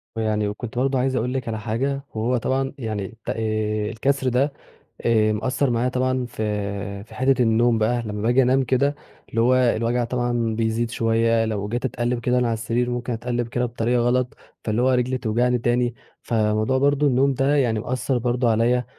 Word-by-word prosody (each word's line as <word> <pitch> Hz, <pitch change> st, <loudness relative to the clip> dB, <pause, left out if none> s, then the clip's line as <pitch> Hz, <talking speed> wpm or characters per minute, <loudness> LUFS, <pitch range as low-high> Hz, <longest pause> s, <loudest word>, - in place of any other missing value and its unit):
ويعني 110 Hz, -2 st, 0 dB
وكنت 110 Hz, +3 st, -6 dB
برضو 135 Hz, +1 st, +1 dB
عايز 130 Hz, +1 st, 0 dB
أقول 125 Hz, +1 st, -1 dB
لِك 130 Hz, -3 st, -3 dB
على 110 Hz, -1 st, -3 dB
حاجة، 135 Hz, +5 st, -2 dB
وهو 120 Hz, +3 st, +1 dB
طبعًا 135 Hz, +3 st, -1 dB
يعني 110 Hz, -6 st, -3 dB, 0.2 s
ت -, -, -4 dB
آآ، 110 Hz, -1 st, -1 dB
الكسر 135 Hz, +2 st, 0 dB
ده 135 Hz, +4 st, +1 dB, 0.5 s
آآ 110 Hz, -2 st, +3 dB
مأثَّر 130 Hz, +5 st, 0 dB
معايا 120 Hz, +1 st, +1 dB
طبعًا 130 Hz, 0 st, 0 dB
في 100 Hz, -3 st, -4 dB
في 110 Hz, -, -15 dB
حتة 130 Hz, 0 st, +2 dB
النوم 115 Hz, 0 st, +3 dB
بقى، 120 Hz, +2 st, +1 dB
لما 105 Hz, -2 st, -5 dB
باجي 120 Hz, +4 st, +3 dB
أنام 130 Hz, +1 st, +3 dB
كده 140 Hz, +3 st, +1 dB, 0.3 s
اللي 115 Hz, -, 0 dB
هو 125 Hz, +2 st, +4 dB
الوجع 120 Hz, -1 st, +2 dB
طبعًا 120 Hz, -2 st, -1 dB
بيزيد 115 Hz, +1 st, 0 dB
شوية، 115 Hz, 0 st, +2 dB
لو 105 Hz, -2 st, -2 dB
جيت 120 Hz, +4 st, -2 dB
أتقلِّب 120 Hz, -1 st, -1 dB
كده 125 Hz, +1 st, +1 dB
من 125 Hz, -, +2 dB
على 115 Hz, -, +1 dB
السرير 115 Hz, +2 st, -1 dB
ممكن 120 Hz, 0 st, -3 dB
أتقِّلب 120 Hz, +1 st, -2 dB
كده 125 Hz, +1 st, -1 dB
بطريقة 120 Hz, +1 st, 0 dB
غلط 125 Hz, +1 st, 0 dB, 0.3 s
فاللي 110 Hz, +2 st, 0 dB
هو 130 Hz, -, +3 dB
رجلي 130 Hz, 0 st, +1 dB
توجعني 125 Hz, +2 st, +1 dB
تاني، 120 Hz, 0 st, 0 dB, 0.3 s
فموضوع 110 Hz, +2 st, +1 dB
برضو 145 Hz, +2 st, +3 dB
النوم 135 Hz, +1 st, +3 dB
ده 135 Hz, +3 st, +2 dB
يعني 120 Hz, -6 st, +2 dB
مأثَّر 125 Hz, +2 st, -1 dB
برضو 120 Hz, 0 st, 0 dB
عليّا، 115 Hz, +2 st, +2 dB
120 Hz, 185 wpm, -23 LUFS, 110-125 Hz, 0.5 s, هو